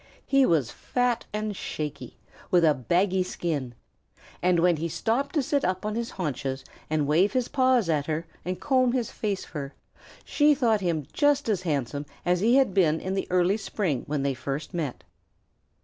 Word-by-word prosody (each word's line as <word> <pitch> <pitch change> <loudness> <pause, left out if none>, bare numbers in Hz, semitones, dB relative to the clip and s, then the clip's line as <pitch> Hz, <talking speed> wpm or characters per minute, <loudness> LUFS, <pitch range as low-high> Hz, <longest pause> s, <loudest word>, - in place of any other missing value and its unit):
He 275 -1 +4
was 145 -9 +2
fat 245 -2 -1
and 210 -1 -3
shaky, 150 -5 -5 0.3
with 175 -2 +4
a 155 - +5
baggy 180 - +1
skin, 150 -9 -3 0.7
and 180 -1 +3
when 175 -1 +3
he 165 +2 -2
stopped 245 - -1
to 295 - +2
sit 280 +2 0
up 185 +2 -1
on 215 - -1
his 235 +1 -2
haunches 140 -6 -4 0.2
and 155 -1 +1
wave 170 - +3
his 255 -2 +1
paws 255 - +2
at 150 -3 0
her 160 +1 -2 0.2
and 180 +1 -3
comb 255 -3 +2
his 245 -4 -1
face 200 -3 -3
fur, 140 -2 -6 0.5
she 295 0 +4
thought 230 -6 +2
him 165 -5 -1
just 290 -2 +2
as 205 -5 +1
handsome 145 -3 -2 0.2
as 180 0 +2
he 230 +6 +4
had 265 -8 +4
been 165 -5 +3
in 190 - -3
the 195 - -2
early 180 +3 +3
spring 180 - -2
when 145 -1 -1
they 140 -1 +1
first 135 +4 -5
met. 155 -7 -3
180 Hz, 180 wpm, -26 LUFS, 150-230 Hz, 0.7 s, a